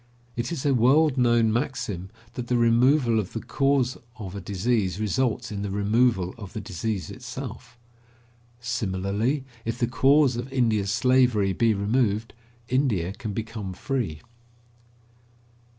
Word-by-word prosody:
It 120 +5 -3
is 155 -5 -4
a 140 - +3
world 135 +5 +4
known 120 -3 +3
maxim 110 -7 -2 0.2
that 120 -1 -5
the 125 - +2
removal 120 +1 +4
of 100 - -4
the 115 - -2
cause 135 -1 +1 0.2
of 95 -4 -7
a 100 - -5
disease 100 0 -1
results 115 +1 -1
in 100 -1 -4
the 100 - -3
removal 100 -1 +1
of 100 -2 -9
the 110 - -4
disease 105 -1 -4
itself. 125 -1 -8 0.8
Similarly, 110 +2 -1 0.2
if 115 0 -3
the 120 - +2
cause 135 +1 +3
of 125 +2 -5
India's 110 -6 +1
slavery 120 -4 +3
be 115 +3 +2
removed, 110 +1 0 0.3
India 110 -10 0
can 110 0 -6
become 110 -3 -5
free. 100 - -3
115 Hz, 135 wpm, -25 LUFS, 100-125 Hz, 0.8 s, world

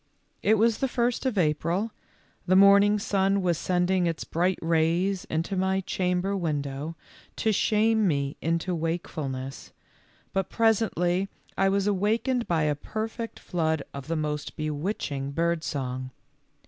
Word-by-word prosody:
It 220 +2 +4
was 225 +1 +3
the 270 - +1
first 245 +1 0
of 240 -5 -1
April, 175 +6 +1 0.6
the 185 - +4
morning 200 +2 +7
sun 195 -1 +1
was 175 -3 +1
sending 180 0 +1
its 165 -1 -2
bright 180 +3 0
rays 170 +4 +1
into 165 +5 -2
my 190 +1 +1
chamber 180 +1 -1
window, 150 -3 -3 0.4
to 220 - +1
shame 215 +1 +3
me 140 -3 0
into 165 +3 0
wakefulness, 155 -5 -4 0.6
but 195 -1 0
presently 195 -5 +1 0.3
I 195 0 +3
was 195 0 +1
awakened 220 +5 +1
by 165 -3 +1
a 150 -1 +2
perfect 225 - -5
flood 160 -4 -1
of 140 -2 -7
the 165 - -1
most 150 -2 -3
bewitching 150 -3 -3
bird 170 +1 0
song. 130 -3 -3
180 Hz, 135 wpm, -27 LUFS, 160-200 Hz, 0.6 s, morning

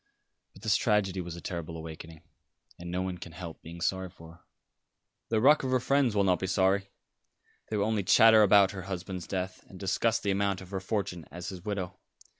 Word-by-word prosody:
But 95 - -16
this 110 -4 +3
tragedy 95 -4 +1
was 85 -1 -7
a 85 - -9
terrible 85 -2 -5
awakening, 80 0 -9 0.6
and 85 0 -7
no 90 +1 -1
one 90 -1 -4
can 85 -1 -9
help 85 -2 -8
being 85 +1 -10
sorry 95 +1 -1
for 85 -2 -14
her." 85 - -20 0.9
"The 110 - +2
ruck 145 +7 +6
of 130 - -2
her 130 0 +3
friends 135 -3 +2
will 100 - +3
not 90 -3 +2
be 95 - -2
sorry. 95 +1 +2 0.8
They 110 - -1
will 100 - +1
only 110 -1 0
chatter 110 +3 +7
about 100 -1 +6
her 100 -2 -6
husband's 95 -1 -5
death, 95 -1 -4
and 95 - -12
discuss 105 +4 +1
the 100 - -1
amount 100 -1 0
of 95 0 -12
her 95 - -2
fortune 95 -4 -3
as 90 +4 -7
his 90 -3 -8
widow. 100 -4 -4
95 Hz, 210 wpm, -29 LUFS, 90-105 Hz, 0.9 s, chatter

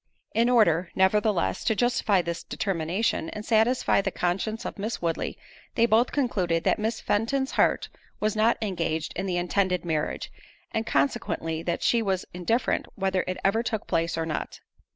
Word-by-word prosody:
In 235 +2 +3
order, 185 -8 +4
nevertheless, 195 0 +2
to 220 - +2
justify 215 -5 +2
this 170 0 -3
determination, 180 -1 -1
and 210 0 -7
satisfy 225 -1 +3
the 195 - -1
conscience 195 +6 -2
of - - -5
Miss 215 +3 -3
Woodley, 165 -1 -2 0.4
they 230 - +4
both 235 +2 +3
concluded 185 - 0
that - - +2
Miss 220 +1 -1
Fenton's 265 +6 0
heart - - +2 0.3
was 215 0 0
not 220 +2 +3
engaged 165 -5 -2
in 190 +3 -2
the 180 -1 0
intended 180 0 0
marriage, 155 -2 -2 0.4
and 225 0 -2
consequently 160 +3 0
that 170 0 -2
she 235 - +3
was 190 -4 -1
indifferent 205 +8 0
whether 190 -1 0
it 185 - -2
ever 210 +4 +3
took 225 -2 -3
place 165 -1 0
or 165 - -1
not. 155 -2 -4
195 Hz, 165 wpm, -26 LUFS, 170-225 Hz, 0.4 s, order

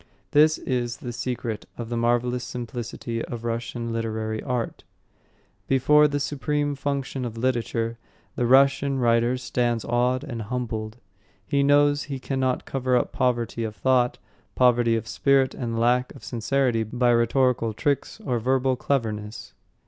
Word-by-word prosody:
This 155 +1 +5
is 120 -1 -2
the 120 -1 -6
secret 120 -2 -4
of 115 -1 -6
the 120 - -2
marvellous 120 +1 +1
simplicity 120 -1 -5
of 120 -2 -7
Russian 115 0 -3
literary 110 -1 -2
art. 125 -3 -3 0.8
Before 150 +3 +5
the 145 0 -2
supreme 145 +1 -1
function 140 -1 -3
of 115 -2 -5
literature, 115 -1 -1 0.4
the 120 - 0
Russian 135 +1 +4
writer 120 0 +2
stands 120 -2 -1
awed 125 +2 +1
and 120 -6 -5
humbled. 110 -1 -4 0.5
He 140 +8 +1
knows 145 +1 +4
he 140 -2 -4
cannot 130 -1 -1
cover 130 -2 +1
up - - -1
poverty 120 -2 0
of 110 -1 -4
thought, 125 -1 +2 0.4
poverty 120 -2 +4
of 115 0 -3
spirit 135 +2 +2
and 115 -3 -4
lack 125 +2 +1
of - - -13
sincerity 120 0 0
by 120 +3 +1
rhetorical 120 0 +2
tricks 145 - -1
or 125 -2 0
verbal 130 +2 +1
cleverness. 110 -6 -3
125 Hz, 140 wpm, -25 LUFS, 115-135 Hz, 0.8 s, This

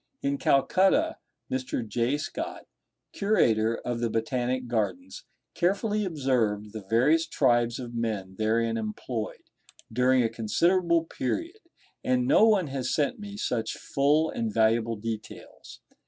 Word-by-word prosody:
In 140 0 0
Calcutta 190 - +3 0.3
Mr. 130 -2 -2
J. 120 +6 0
Scott, 320 - -5 0.5
curator 115 - +2
of 120 -1 -2
the 120 -1 0
Botanic 125 +3 -1
Gardens, 265 - -3 0.3
carefully 205 +4 0
observed 120 - 0
the 110 - -6
various 130 +11 +2
tribes 120 -5 +2
of 120 -2 -7
men 110 -5 -3
therein 115 +1 +1
employed 110 +1 -5 0.4
during 125 +1 +3
a - - +2
considerable 170 - +2
period, 330 - -4 0.4
and 125 -1 +1
no 175 - +5
one 205 -5 +3
has 135 -3 -3
sent 155 - 0
me 205 -1 -8
such 120 - -2
full 150 +3 +1
and 115 -2 -2
valuable 115 +1 +2
details. 110 0 -8
125 Hz, 125 wpm, -27 LUFS, 115-165 Hz, 0.5 s, no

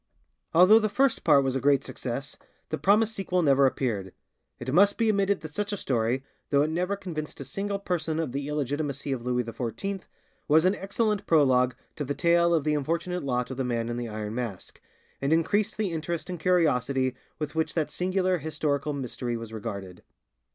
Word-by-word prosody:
Although 185 +6 +7
the 215 -1 0
first 265 +4 +2
part 140 - +5
was 135 -1 -1
a - - +1
great 140 -1 +3
success, 135 +3 -5 0.3
the 155 - -3
promised 210 +7 +3
sequel 185 -3 0
never 140 -2 +5
appeared. 105 -8 -2 0.4
It 130 +2 -4
must 200 +4 +5
be 230 -1 +2
admitted 200 -1 +2
that 155 -3 -8
such 205 +3 -2
a 205 - -2
story, 125 -3 0 0.3
though 140 0 +4
it 155 - -1
never 180 +4 0
convinced 165 -6 -6
a - - -6
single 200 0 -3
person 165 -5 -2
of 160 -6 -2
the 140 +2 -3
illegitimacy 145 -1 -2
of 130 -3 -2
Louis 125 0 0
XIV, 120 - -4 0.4
was 160 +3 +5
an 185 - +4
excellent 205 +1 -1
prologue 130 -5 +4 0.2
to 150 - -2
the 145 +1 -3
tale 170 0 +3
of 165 -4 +2
the 150 0 +1
unfortunate 170 +5 -1
lot 125 -2 -1
of 130 - -5
the 135 - 0
Man 120 -2 -1
in 120 - -3
the 120 -1 -4
Iron 105 0 -4
Mask, 115 -6 -6 0.4
and 140 +2 0
increased 180 +6 +2
the 210 -4 -1
interest 165 +2 -3
and 175 - -5
curiosity 135 -7 +2 0.2
with 150 -1 -4
which 160 0 -1
that 160 -3 0
singular 185 0 0
historical 150 -1 -1
mystery 125 -3 -3
was 115 -1 -8
regarded. 100 -5 -6
150 Hz, 195 wpm, -27 LUFS, 130-180 Hz, 0.4 s, Although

